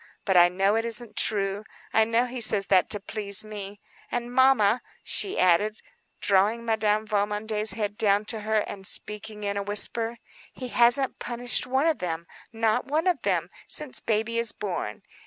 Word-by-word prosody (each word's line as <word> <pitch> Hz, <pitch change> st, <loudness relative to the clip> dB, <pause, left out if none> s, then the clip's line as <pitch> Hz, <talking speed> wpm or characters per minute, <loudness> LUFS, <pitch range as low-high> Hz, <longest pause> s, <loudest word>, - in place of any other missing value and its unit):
But 190 Hz, -, +1 dB
I 175 Hz, 0 st, +7 dB
know 195 Hz, +3 st, +1 dB
it 225 Hz, -, 0 dB
isn't 235 Hz, -1 st, -3 dB
true. 200 Hz, -1 st, 0 dB, 0.3 s
I 220 Hz, -, +4 dB
know 230 Hz, +2 st, +1 dB
he 250 Hz, 0 st, -6 dB
says 210 Hz, -3 st, +1 dB
that 185 Hz, -3 st, +3 dB
to 205 Hz, -, +2 dB
please 200 Hz, 0 st, +1 dB
me. 205 Hz, -1 st, -8 dB, 0.3 s
And 240 Hz, 0 st, -4 dB
mamma," 250 Hz, -4 st, +4 dB, 0.2 s
she 390 Hz, -, 0 dB
added, 195 Hz, +5 st, +2 dB, 0.4 s
drawing 205 Hz, +4 st, +1 dB
Madame 215 Hz, -1 st, 0 dB
Valmondé's 210 Hz, 0 st, -1 dB
head 210 Hz, 0 st, -4 dB
down 205 Hz, 0 st, +2 dB
to 220 Hz, +1 st, -2 dB
her, 215 Hz, 0 st, 0 dB
and 195 Hz, -1 st, -5 dB
speaking 210 Hz, 0 st, -1 dB
in 200 Hz, 0 st, -2 dB
a -, -, -1 dB
whisper, 225 Hz, +3 st, 0 dB, 0.4 s
"he 255 Hz, -1 st, -7 dB
hasn't 245 Hz, +3 st, +3 dB
punished 245 Hz, +1 st, -1 dB
one 265 Hz, +3 st, +1 dB
of 325 Hz, -2 st, +1 dB
them—not 185 Hz, +6 st, -3 dB
one 305 Hz, +5 st, -1 dB
of 355 Hz, -8 st, +1 dB
them—since 190 Hz, -, 0 dB
baby 225 Hz, +1 st, -1 dB
is 230 Hz, -3 st, +3 dB
born. 175 Hz, -, -5 dB
215 Hz, 165 wpm, -25 LUFS, 200-235 Hz, 0.4 s, I